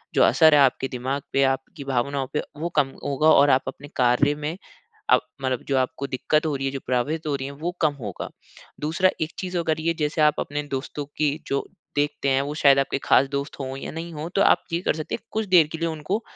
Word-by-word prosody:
जो - - +5
असर 160 -1 +6
है - - +6
आपके 135 0 +3
दिमाग 130 +2 -3
पे, 135 - +4
आपकी 135 +2 -1
भावनाओं 135 +1 -1
पे, 150 - +1 0.2
वो 165 +3 -2
कम 145 -3 +4 0.2
होगा, 145 +2 +2
और 145 -2 +6
आप 130 0 +4
अपने 145 - -7
कार्य 130 +4 +3
में, 150 +3 -4 0.5
अब - - +6 0.2
मतलब 130 -2 -1
जो 135 - +1
आपको 130 +2 -2
दिक्कत 150 +4 0
हो 155 - 0
रही 135 0 -3
है, - - 0
जो 135 - -4
प्रभावित 145 +6 -1
हो 150 - 0
रही 135 -1 -5
है, 140 - -6
वो 155 +5 -3
कम 155 -3 +2
होगा। 100 -6 -5 0.5
दूसरा 170 +5 +2
एक 160 +1 -2
चीज़ 185 -1 -4
अगर 160 -2 0
ये, 165 +1 0
जैसे 155 -1 -1
आप 150 -1 +4
अपने 145 +1 -3
दोस्तों 145 +2 -5
की 150 -1 +1
जो 140 - -1 0.3
देखते 145 -1 0
हैं, 135 0 +3
वो 145 +1 -4
शायद 140 -2 +5
आपके 135 0 0
ख़ास 135 - +5
दोस्त 140 +1 -4
हों 135 0 -4
या 135 - -6
नहीं 165 +1 -6
हों, 155 +2 -5
तो 200 - +4
आप - - +4
ये 170 - 0
कर - - +1
सकते 155 - -4
हैं, - - -5
कुछ 220 0 -2
देर 180 -5 +6
के 160 - -4
लिए 165 0 0
उनको 165 +7 -3
145 Hz, 240 wpm, -24 LUFS, 135-160 Hz, 0.5 s, असर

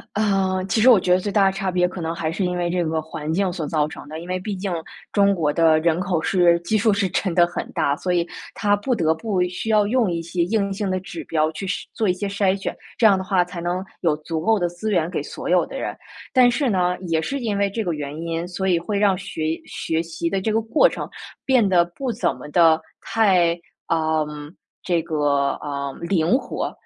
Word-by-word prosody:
啊， 195 -3 +1
其 205 +3 +1
实 240 - +6
我 225 -6 +7
觉 180 0 +1
得 180 - +5
最 200 +2 -3
大 200 -2 +4
的 195 - +3
差 195 -1 -2
别 180 0 +2
可 185 - -7
能 165 0 -2
还 165 -2 -2
是 185 +4 -2
因 180 0 -1
为 175 -1 -1
这 175 -1 0
个 160 0 -1
环 155 0 -5
境 190 +1 +1
所 165 -4 -4
造 150 0 0
成 150 - -10
的， 155 +1 -6
因 175 - -10
为 185 0 -1
毕 200 +3 -4
竟 190 -1 -3 0.4
中 200 -1 +4
国 155 -4 0
的 160 0 +4
人 165 +1 +2
口 180 -3 -1
是 175 -3 +4
基 215 +6 0
数 220 +1 +3
是 200 -1 +1
真 180 -1 -1
的 175 - +6
很 175 - -5
大， 140 +1 +1
所 180 +2 -2
以 170 -1 +2 0.3
它 205 -1 +2
不 250 +5 -1
得 160 -7 +2
不 185 +2 -1
需 185 +5 -4
要 210 -1 +4
用 230 -1 +2
一 165 -1 -2
些 170 +1 -1
硬 200 +1 0
性 200 0 -2
的 185 0 -1
指 180 -2 -8
标 155 -1 +1
去 160 +5 -6
筛 195 - -2
做 215 -3 0
一 - - +4
些 190 +3 -4
筛 195 -1 +1
选， 195 - -4 0.2
这 - - 0
样 200 -3 +6
的 190 - -4
话 185 -2 +2
才 180 -1 -7
能 180 +2 -2 0.2
有 160 -4 +2
足 160 +1 -4
够 220 +7 +3
的 175 -4 0
资 175 +5 -5
源 170 -2 +1
给 - - -2
所 - - -6
有 - - +4
的 - - -7
人。 - - -4 0.4
但 255 -2 +6
是 250 0 +1
呢， 180 -2 +1
也 160 -1 +2
是 275 +12 -3
因 215 -4 -1
为 200 - +2
这 220 +3 -3
个 175 - -1
原 145 -1 -5
因， 165 +1 -3
所 190 +1 -3
以 175 -2 +3
会 200 +5 -3
让 195 -3 +3
学 165 -5 -3
学 160 0 -2
习 165 0 -3
的 195 - 0
这 215 +3 -1
个 225 +1 +1
过 300 - +4
程 - - -6 0.4
变 255 -6 +3
得 175 -2 +4
不 245 +8 -4
怎 180 -4 -1
么 - - -10
的 165 -1 +5 0.2
太， 180 -6 +2 0.3
呃， 160 -1 +1 0.6
这 175 -3 +1
个， 145 -3 +1
呃， 140 -1 -4
灵 170 +5 +2
活。 - - -4
180 Hz, 265 characters per minute, -22 LUFS, 165-200 Hz, 0.6 s, 我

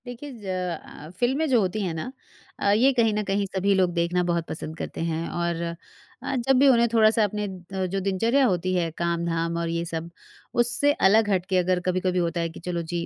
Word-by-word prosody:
देखिए 245 +4 -8
ज़ - - -11
अ, 180 -4 -5
फ़िल्में 270 +6 +1
जो 250 -3 +4
होती 190 +2 -1
हैं 180 -3 -2
ना? 160 +10 -5 0.5
अ, 200 - +2
ये 240 +7 +4
कहीं 230 -3 +2
न 210 0 -1
कहीं 200 0 0
सभी 200 +1 +2
लोग 185 -2 +2
देखना 170 +1 +1
बहुत 170 -1 -1
पसंद 160 0 -6
करते - - -5
हैं 160 +1 -3
और 170 -1 -2 0.6
अ, 275 - -2
जब 270 - +5
भी 280 - +6
उन्हें 235 -3 +5
थोड़ा-सा 220 0 +4
अपने 210 0 -1
अ, 190 0 -5
जो 190 +2 -2
दिनचर्या 230 +8 +2
होती 185 -4 0
है, 170 -2 0
काम-धाम 170 -1 -1
और 170 0 -2
ये 170 0 -1
सब 165 0 -5 0.5
उससे 245 +5 +3 0.2
अलग 215 +1 +4
हट 185 -3 +1
के 190 - +2
अगर 180 0 +2
कभी-कभी 185 0 0
होता 170 0 -1
है 165 - -1
कि 165 - -11
चलो 175 0 -3
जी, 170 -1 -2
185 Hz, 215 wpm, -25 LUFS, 170-215 Hz, 0.6 s, भी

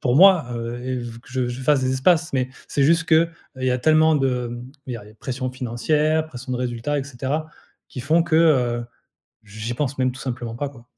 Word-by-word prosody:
pour 125 -4 +1
moi, 185 -5 +7
heu, 115 +1 -4
et 130 0 -2
v 120 -1 -7
que - - -19
je 130 -2 -1
je 120 +2 -5
fasse 145 0 +3
des 130 0 0
espaces. 160 +5 +2
Mais 130 -1 0 0.2
c'est 140 - +1
juste 165 +3 +4
que, 165 - +3
heu, 165 +1 +4 0.3
il 130 - -4
y - - +3
a 125 - +1
tellement 155 +3 +4
de, 125 -3 0
hem 120 +2 -9
il 125 - -4
y - - -3
a 105 - -11
les 105 - -16
pression 130 +3 -4
financière, 150 +6 0
pression 130 -3 -7
de 125 - 0
résultats 125 +4 -2
et 135 - -3
cetera, 140 +4 -3 0.4
qui 130 - -7
font 160 +6 +3
que, 165 -2 +1
heu, 125 -7 +3 0.6
j'y 110 +3 -6
pense 140 0 -2
même 130 -1 +1
tout 130 - -11
simplement 120 -3 -4
pas, 145 +2 -2
quoi. 120 -3 -16
130 Hz, 240 wpm, -22 LUFS, 120-150 Hz, 0.6 s, moi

